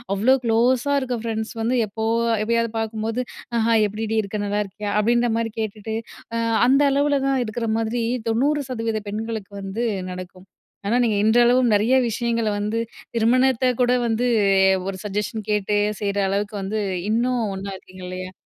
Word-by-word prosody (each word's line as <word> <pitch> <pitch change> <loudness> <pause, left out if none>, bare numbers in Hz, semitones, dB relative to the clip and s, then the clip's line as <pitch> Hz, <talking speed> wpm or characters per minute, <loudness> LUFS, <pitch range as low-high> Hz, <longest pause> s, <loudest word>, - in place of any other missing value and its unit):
அவ்வளோ 235 +7 +4
க்ளோஸா 240 +4 +2
இருக்க 255 -2 -2
ஃபரெண்ட்ஸ் 220 -1 -3
வந்து 235 +3 +1
எப்போ 220 +2 -5 0.4
எப்போயாவது 230 0 +1
பார்க்கும்போது, 220 +1 -2 0.4
"அ - - +2
ஹாய் 225 -2 +4
எப்படிடி 220 +2 -3
இருக்க? 210 0 -5
நல்லா 205 +1 -1
இருக்கியா?" 205 +1 -6
அப்படீன்ற 240 +3 +2
மாரி 230 0 -1
கேட்டுட்டு, 220 0 -4 0.4
அ - - 0 0.3
அந்த 275 +3 +5
அளவுல 285 +1 +2
தான் 270 -1 +2
இருக்கிற 230 +2 -3
மாதிரி 225 +1 -1 0.3
90% 245 -3 0
பெண்களுக்கு 220 -1 -4
வந்து 195 +5 -3 0.3
நடக்கும். 185 0 -9 0.4
ஆனா, 225 - +2
நீங்க 225 -3 +1
இன்றளவும் 240 +2 +4
நெறைய 215 +5 +3 0.2
விஷயங்களை 230 -1 0
வந்து, 210 +2 -1 0.4
திருமணத்தை 255 +2 +3
கூட 245 0 +4
வந்து 230 +2 +1 0.6
ஒரு 195 -1 -3
சஜஷன் 210 +1 -3
கேட்டு 210 0 +1 0.2
செய்ற 200 -1 -1
அளவுக்கு 205 +2 -2
வந்து, 200 +3 -2 0.3
இன்னும் 240 +2 +1
ஒன்னா 195 +1 -5
இருக்கீங்க 185 0 -13
இல்லையா? 185 0 -6
225 Hz, 150 wpm, -22 LUFS, 210-240 Hz, 0.6 s, அந்த